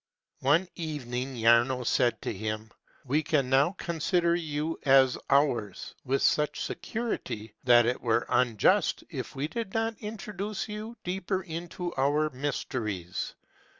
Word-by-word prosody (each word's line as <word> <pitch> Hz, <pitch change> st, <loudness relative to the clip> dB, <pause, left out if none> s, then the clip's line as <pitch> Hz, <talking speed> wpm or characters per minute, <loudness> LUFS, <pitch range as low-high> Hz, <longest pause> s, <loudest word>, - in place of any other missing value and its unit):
One 150 Hz, +8 st, +3 dB
evening 135 Hz, -5 st, -4 dB
Jaruo 120 Hz, +2 st, +4 dB
said 120 Hz, 0 st, +2 dB
to -, -, -2 dB
him, 110 Hz, +1 st, -4 dB, 0.3 s
"We 145 Hz, +4 st, +2 dB
can 140 Hz, -4 st, 0 dB
now 140 Hz, +7 st, +4 dB
consider 170 Hz, +1 st, +1 dB
you 160 Hz, -1 st, -2 dB
as 135 Hz, -3 st, +5 dB
ours, 130 Hz, -9 st, +1 dB
with 135 Hz, +1 st, 0 dB
such 150 Hz, 0 st, +2 dB
security, 165 Hz, -, -4 dB
that 120 Hz, -2 st, +7 dB
it 120 Hz, +2 st, 0 dB
were 120 Hz, 0 st, +1 dB
unjust 115 Hz, -5 st, +2 dB
i -, -, -5 dB
f -, -, -5 dB
we 135 Hz, +2 st, -1 dB
did 205 Hz, +5 st, -5 dB
not 225 Hz, 0 st, 0 dB
introduce 210 Hz, -1 st, -5 dB
you 215 Hz, +2 st, -6 dB
deeper 185 Hz, +1 st, -2 dB
into 175 Hz, +1 st, -5 dB
our 145 Hz, +3 st, +2 dB
mysteries. 110 Hz, -9 st, -3 dB
145 Hz, 135 wpm, -29 LUFS, 120-175 Hz, 0.3 s, that